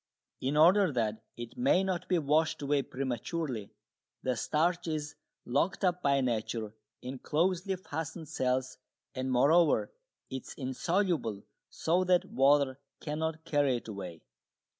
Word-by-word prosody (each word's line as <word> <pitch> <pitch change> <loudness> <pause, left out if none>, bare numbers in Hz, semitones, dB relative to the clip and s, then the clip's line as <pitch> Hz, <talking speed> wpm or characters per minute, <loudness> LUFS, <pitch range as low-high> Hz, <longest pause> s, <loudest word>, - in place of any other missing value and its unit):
In 140 +3 -1
order 180 +3 +6
that 110 -4 -1 0.2
it 120 - -8
may 250 -7 +4
not 185 -2 -2
be 180 - +3
washed 155 0 +1
away 140 0 +2
prematurely, 130 -2 -3 0.5
the 130 -1 0
starch 170 +7 0
is 150 -2 -3 0.3
locked 190 +2 +1
up 180 0 +1
by 140 -2 +3
nature 110 -3 -2 0.3
in 130 +1 -6
closely 180 +6 0
fastened 160 -2 -6
cells, 130 -1 -1 0.3
and, 130 0 -2
moreover, 155 - +4 0.4
it 130 -1 -5
is - - -8
insoluble, 145 - -1 0.3
so 175 +3 +1
that 180 -1 +3
water 140 0 +3 0.2
cannot 160 +1 -3
carry 145 -4 +2
it 120 - -10
away. 95 -6 -7
145 Hz, 135 wpm, -31 LUFS, 130-170 Hz, 0.5 s, order